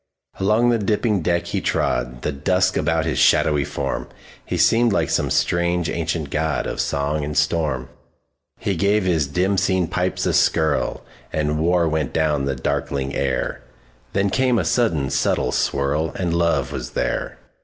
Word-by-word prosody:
Along 110 +5 +3
the 115 - +1
dipping 105 0 +1
deck 85 +1 0
he - - -2
trod, - - -1
The - - 0
dusk 90 +7 +1
about - - +1
his - - -1
shadowy 75 -2 +4
form; - - -3 0.4
He - - -3
seemed 115 0 +4
like 100 - 0
some - - +1
strange 85 -1 +1
ancient 80 -3 -3
godOf 80 -1 -1
song 75 +2 -1
and 75 +1 -4
storm. 75 -4 0 0.7
He 100 - -2
gave 100 +4 +2
his 80 -6 +1
dim 95 +6 +1
seen 95 -2 +1
pipes 90 +2 -1
a - - +1
skirlAnd 75 -1 0
war 85 +1 +2
went 80 -4 -1
down 75 -3 +1
the 70 -1 -1
darkling 70 +2 -2
air; 70 -2 -2 0.5
Then 100 0 +1
came 130 0 +2
a 90 - 0
sudden 85 - +1
subtle 60 - +1
swirl, 75 +3 0
And 90 -3 -1
love 85 -7 +1
was - - -6
there. - - -2
80 Hz, 155 wpm, -21 LUFS, 70-95 Hz, 0.7 s, shadowy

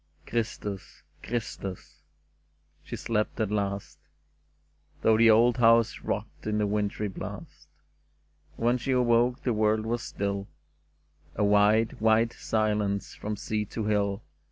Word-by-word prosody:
'* - - -35
Christus! 105 -4 -4 0.2
Christus! 110 -5 -5 0.4
" 75 0 -41
She - - -6
slept 110 0 -2
at 110 -2 0
last. 100 -1 -3 1.0
Though 110 - +5
the 115 +1 +6
old 115 +3 +5
house 115 -1 +4
rocked - - -5
in 105 0 0
the 105 - +1
wintry 105 0 -1
blast; 95 - -8 0.9
And 115 - -3
when 120 +1 +3
she 130 +2 -1
awoke 125 0 +2
the 125 - +1
world 110 0 +1
was 120 +1 -1
still, 100 -3 -3 0.9
A 105 - 0
wide, 105 +2 +3
white 110 +1 +3
silence 105 -2 -1
from 105 0 -4
sea 105 +1 -2
to 110 +2 -5
hill. 100 -1 0
110 Hz, 135 wpm, -28 LUFS, 100-115 Hz, 1.0 s, the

